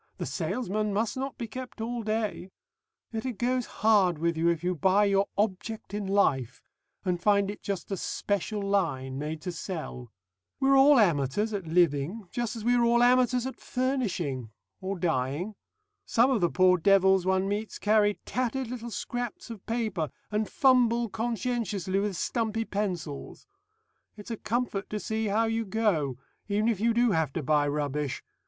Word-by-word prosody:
The - - -3
salesman 215 -3 -2
must 220 +1 0
not 270 +1 -4
be 235 - -4
kept 255 +2 -8
all 235 +2 -3
day.... 215 -4 -2 0.6
Yet 225 -1 -3
it 255 -5 -4
goes 250 +2 0
hard 200 -6 +3
with 170 +2 0
you 165 +1 +1
if 170 -1 -1
you 180 +1 +1
buy 190 +5 +3
your 200 0 +2
Object 210 +1 -2
in 205 -1 -3
Life 135 - +1 0.4
and 180 -2 0
find 200 0 +3
it 205 - -10
just 200 0 -4
a 195 - -1
'special 205 +3 -2
line' 140 -10 -1
made 155 +1 -4
to 180 - -3
sell.... 155 - -6 0.5
We're 270 0 +4
all 275 +1 +7
amateurs 190 - +2
at 195 -5 -4
living, 170 +4 +1
just 240 -2 -2
as 225 - -6
we 240 +2 +3
are 240 -1 +3
all 235 +1 +4
amateurs 250 0 +4
at 265 - -6
furnishing 195 - -2 0.3
or 190 +1 -3
dying. 160 +4 -1 0.5
Some 240 +4 +4
of 235 -6 +1
the 175 - +3
poor 185 -1 +4
devils 190 0 +4
one 190 0 +2
meets 205 +2 -3
carry 210 -1 +3
tattered 255 0 -2
little 235 -1 -5
scraps 245 0 -5
of 215 -4 -9
paper, 215 - -1 0.2
and 210 0 0
fumble 240 -3 +3
conscientiously 220 -4 -1
with 200 -3 -1
stumpy 225 -1 -1
pencils. 180 -9 -4 0.7
It's 210 +3 -9
a 230 - -3
comfort 225 -3 -2
to 210 - -3
see 220 +1 -2
how 215 +3 +2
you 225 0 0
go, 190 - 0 0.3
even 210 +2 +1
if 220 -5 0
you 230 +2 +3
do 240 0 +3
have 160 -6 +1
to 165 - -3
buy 145 +1 +2
rubbish. 145 -1 -2
205 Hz, 170 wpm, -28 LUFS, 175-230 Hz, 0.7 s, all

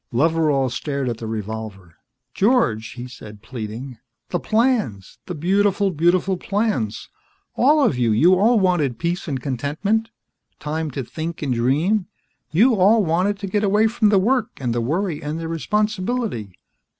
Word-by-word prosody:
Loveral 145 -1 +2
stared 140 0 -2
at 115 - -3
the 115 - -5
revolver. 110 -4 -6 0.4
"George," 195 - +1
he 120 +1 -7
said, 105 -4 -12
pleading. 115 +1 -7 0.3
"The - - -1
plans. 215 - 0
The 180 - -4
beautiful, 195 +4 +1
beautiful 180 +3 +2
plans. 195 - -2 0.5
All 295 +4 +4
of 130 - +1
you, 120 -2 +2
you 160 +13 +5
all 220 +5 +4
wanted 165 - +1
peace 175 +5 -2
and 135 -4 -2
contentment. 155 - -1 0.5
Time 155 +1 -3
to 135 0 -4
think 160 +6 -6
and 135 -3 0
dream. 155 - +1 0.4
You 230 +10 +4
all 205 +3 +4
wanted 180 +5 +1
to - - -3
get 205 +2 0
away 205 +2 +3
from 220 -1 +2
the 205 - +4
work 235 +4 +2
and 125 -3 -2
the 120 - 0
worry 165 - -1
and 150 +2 -4
the 165 - -4
responsibility. 210 - -2
165 Hz, 155 wpm, -21 LUFS, 125-205 Hz, 0.5 s, you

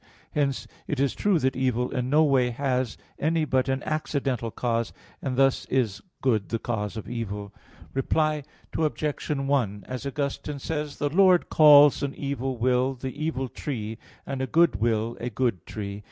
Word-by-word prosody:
Hence 140 -3 0 0.2
it 145 - -2
is 140 -1 +2
true 205 -3 +2
that 130 -3 +1
evil 125 -1 0
in 125 0 -2
no 150 +3 +5
way 135 -4 +3
has 125 -2 -1 0.2
any 160 +1 +1
but 130 -2 +1
an 135 +1 -1
accidental 140 -6 -1
cause; 115 0 -1 0.3
and 130 -2 -2
thus 135 -1 +3
is 115 -7 0 0.2
good 110 -7 +1
the 115 - 0
cause 110 -2 -3
of 105 -3 -6
evil. 105 -3 -5 0.4
Reply 155 +3 +1 0.3
Obj. 155 -1 -1
1: 135 -8 0
As 130 0 -5
Augustine 140 +1 -3
says 150 0 -3
(Contra 145 - -1
Julian. - - -13
i): - - -7
"The 195 - +7
Lord 185 -2 +4
calls 150 -2 +8
an 140 -1 -2
evil 135 -2 -3
will 125 +2 +2
the 130 +1 -5
evil 150 -3 -2
tree, 115 -5 -5 0.3
and 135 -1 -3
a 130 - -1
good 165 -4 +4
will 115 +1 0
a 120 - -3
good 115 -6 -1
tree." 100 -1 -5
130 Hz, 180 wpm, -26 LUFS, 115-145 Hz, 0.4 s, calls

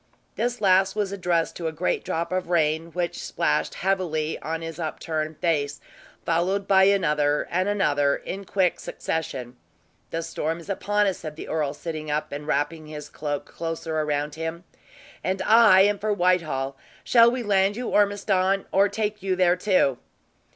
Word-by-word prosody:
This 240 -1 -2
last 190 0 +4
was 205 -2 -1
addressed 175 -4 0
to 170 - -3
a - - -1
great 160 +3 -1
drop 165 +2 -2
of 185 -1 -2
rain, 160 -1 +1
which 175 -1 -3
splashed - - 0
heavily 170 -5 -1
on 165 +1 -4
his 165 +1 -6
upturned 155 -1 -3
face, 145 -4 0 0.5
followed 185 +4 0
by 190 -1 +6
another 150 -7 +2
and 185 +3 +1
another 145 -9 +2
in 195 +1 -6
quick 185 -2 +1
succession. 130 -6 -4 0.5
"The 165 0 -3
storm 165 0 -3
is 170 - -13
upon 205 +2 +1
us," 195 -2 -1
said 155 -2 -7
the - - -8
earl, 150 -2 -1
sitting 155 -1 -6
up 150 +1 -2
and 145 +1 -6
wrapping 155 +2 -1
his 150 -1 -8
cloak 145 -2 -4
closer 165 -1 -5
around 150 -1 -1
him, 165 +2 -5 0.6
"and 190 +1 -1
I 220 -4 +7
am 205 0 +3
for 215 +1 -1
Whitehall. 170 -8 +1 0.3
Shall 235 -1 +6
we 250 0 -2
land 200 0 +2
you, 250 - -3
Ormiston, 195 -1 +2
or 200 +1 +4
take 210 -1 -2
you 190 -1 0
there, 180 -1 +4
too?" 180 -9 +2
170 Hz, 165 wpm, -25 LUFS, 155-195 Hz, 0.6 s, I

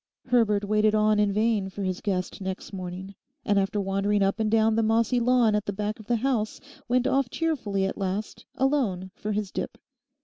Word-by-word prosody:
Herbert 215 -4 +3
waited 215 +1 +3
on 215 0 +3
in 205 -1 +3
vain 210 -1 +1
for 195 +1 -6
his 185 -1 -2
guest 185 -2 -2
next 190 +1 -5
morning, 185 +1 -6 0.3
and 205 -1 +3
after 195 +2 0
wandering 195 +1 +1
up 195 +3 0
and 220 -1 +1
down 220 0 +3
the 225 - +3
mossy 225 +2 +2
lawn 240 -2 +3
at 210 0 0
the 200 - -1
back 210 +2 -3
of 215 - -13
the 240 - +2
house, 225 -6 0 0.3
went 250 0 +2
off 270 -1 +2
cheerfully 230 - -1
at 195 - -4
last 195 +2 -4
alone 235 -10 0
for 215 0 -5
his 205 -2 -2
dip. - - -4
210 Hz, 200 wpm, -26 LUFS, 195-225 Hz, 0.3 s, Herbert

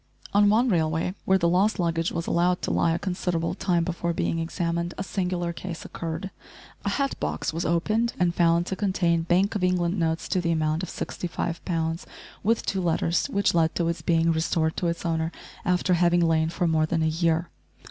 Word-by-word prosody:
On 205 0 +5
one 230 +5 +4
railway 165 -3 +1
where 190 - +4
the 170 -2 +1
lost 190 +5 +2
luggage 165 -1 0
was 170 - -3
allowed 175 +1 +1
to - - -1
lie 165 - +2
a 165 - +1
considerable 180 -3 -2
time 175 -3 +1
before 170 0 -2
being 165 - -1
examined 170 +1 -2
a 190 - -2
singular 180 -2 -2
case 170 0 -7
occurred. 165 +3 -5 0.5
A - - 0
hat 275 -1 -1
box - - -2
was 165 +2 -2
opened 215 +8 +1
and 175 -1 +2
found 170 0 +3
to 190 - -3
contain 185 -4 +1
Bank 180 +5 +2
of 205 -4 -2
England 180 0 +1
notes 165 0 0
to 185 - +1
the 170 -1 0
amount 155 0 0
of 185 - -4
65 170 -1 -4
pounds, 165 -1 -2 0.3
with 225 +3 +1
two 195 - -1
letters, 170 0 +1
which 200 0 +1
led 165 -2 +2
to 170 - 0
its 170 - -3
being 165 -1 +2
restored 160 0 0
to 175 - 0
its 170 +1 -3
owner 160 -1 0 0.3
after 180 +1 +2
having 175 0 +3
lain 160 -1 +2
for 170 +1 -1
more 160 -1 +2
than 165 0 0
a - - +2
year. 165 +1 +1
170 Hz, 200 wpm, -26 LUFS, 165-180 Hz, 0.5 s, On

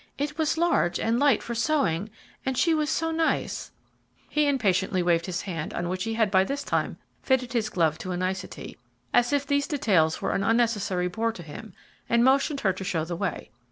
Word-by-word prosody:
"It 295 +2 -2
was 315 0 0
large 330 - +2
and 230 +2 +1
light 280 -5 +3
for 235 - -4
sewing, 230 - 0 0.3
and 265 -1 -2
she 335 +4 +3
was 305 -1 0
so 325 0 0
nice 320 0 -1 0.3
" - - -37
He 300 -1 +2
impatiently 190 -8 +1
waved 170 0 +2
his 180 -1 -3
hand 165 -6 -5
on 175 0 -2
which 185 +3 -2
he 225 0 -2
had 220 -3 +2
by 190 -1 +5
this 280 +7 -3
time - - -1 0.2
fitted 255 -2 +1
his 225 -3 0
glove 160 -3 +1
to 185 - -5
a 175 - -2
nicety, 185 +1 -4 0.3
as 245 +2 +4
if 285 -1 +1
these 285 0 +1
details 185 - +2
were 195 - -1
an 195 - 0
unnecessary 210 -5 +1
bore 225 +5 -1
to 175 - -9
him, 175 +6 -10 0.3
and 235 0 +4
motioned 275 +2 +3
her 190 -4 +2
to 190 - -7
show 165 -4 -1
the 170 +1 -4
way. 165 - -4
225 Hz, 210 wpm, -26 LUFS, 185-275 Hz, 0.3 s, by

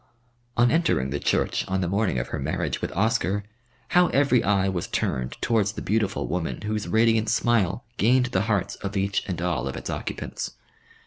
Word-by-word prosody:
On 120 0 +5
entering 95 - +1
the 70 - -1
church - - +1
on 95 0 0
the 90 - 0
morning 100 - 0
of - - -2
her - - -3
marriage - - -2
with - - -2
Oscar, 105 -1 +1 0.5
how 180 0 +5
every 135 -4 +3
eye 100 -1 +2
was 95 -3 -2
turned 65 -1 -1
towards 110 -3 +1
the - - -6
beautiful 105 -2 0
woman 90 -2 -3
whose 105 0 -2
radiant 110 0 +3
smile 110 -2 +1
gained 125 +4 +4
the 95 - +2
hearts 100 -4 +1
of 100 0 -4
each 100 0 +1
and 90 -4 -3
all 85 -7 -1
of 65 - -4
its - - -5
occupants. - - -4
100 Hz, 185 wpm, -25 LUFS, 90-115 Hz, 0.5 s, On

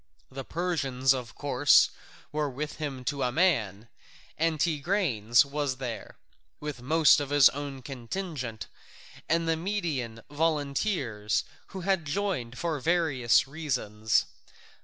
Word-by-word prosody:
The 135 +1 -6
Persians, 135 -6 0
of 125 -4 -6
course, - - +4 0.4
were 150 -1 -1
with 150 +4 -5
him 140 -4 -5
to 140 +1 -2
a 125 - +1
man, 115 - +1 0.5
and 160 -1 0
Tigranes 145 - +2
was 140 -1 -2
there, 125 -4 -6 0.4
with 150 -2 -5
his 145 -3 +6
own 140 -2 -6
contingent, 130 - -5 0.6
and 165 0 +1
the 165 - +2
Median 160 - -3
volunteers, 145 - 0 0.2
who 190 - -7
had 190 -3 0
joined 145 -8 -2
for 165 -3 -2
various 135 - +2
reasons. 125 -8 0
145 Hz, 115 wpm, -28 LUFS, 125-165 Hz, 0.6 s, his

